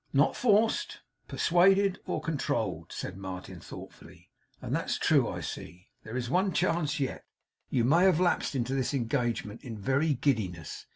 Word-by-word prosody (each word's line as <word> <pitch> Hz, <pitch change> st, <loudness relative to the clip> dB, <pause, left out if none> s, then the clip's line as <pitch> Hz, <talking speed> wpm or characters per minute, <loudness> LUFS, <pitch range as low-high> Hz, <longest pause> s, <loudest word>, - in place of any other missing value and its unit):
'Not 140 Hz, +2 st, +3 dB
forced, 225 Hz, -1 st, +2 dB, 0.3 s
persuaded, 190 Hz, +3 st, +3 dB
or -, -, -2 dB
controlled,' 160 Hz, -4 st, -2 dB
said 95 Hz, -, -5 dB
Martin, 95 Hz, -2 st, -7 dB
thoughtfully. -, -, -12 dB, 0.3 s
'And -, -, -3 dB
that's -, -, -1 dB
true, -, -, +3 dB
I -, -, -5 dB
see. 90 Hz, +4 st, -8 dB
There 110 Hz, +3 st, -6 dB
is 125 Hz, -1 st, -2 dB
one 185 Hz, +7 st, +1 dB
chance 165 Hz, -4 st, +1 dB
yet. 135 Hz, -2 st, -2 dB, 0.5 s
You 120 Hz, -, +1 dB
may 165 Hz, +9 st, +5 dB
have 185 Hz, -4 st, +4 dB
lapsed 175 Hz, -5 st, +1 dB
into 130 Hz, 0 st, -1 dB
this 135 Hz, +1 st, 0 dB
engagement 120 Hz, -3 st, -2 dB
in 115 Hz, -4 st, -6 dB
very 140 Hz, +8 st, +1 dB
giddiness. 100 Hz, -, -2 dB
135 Hz, 155 wpm, -29 LUFS, 115-175 Hz, 0.5 s, may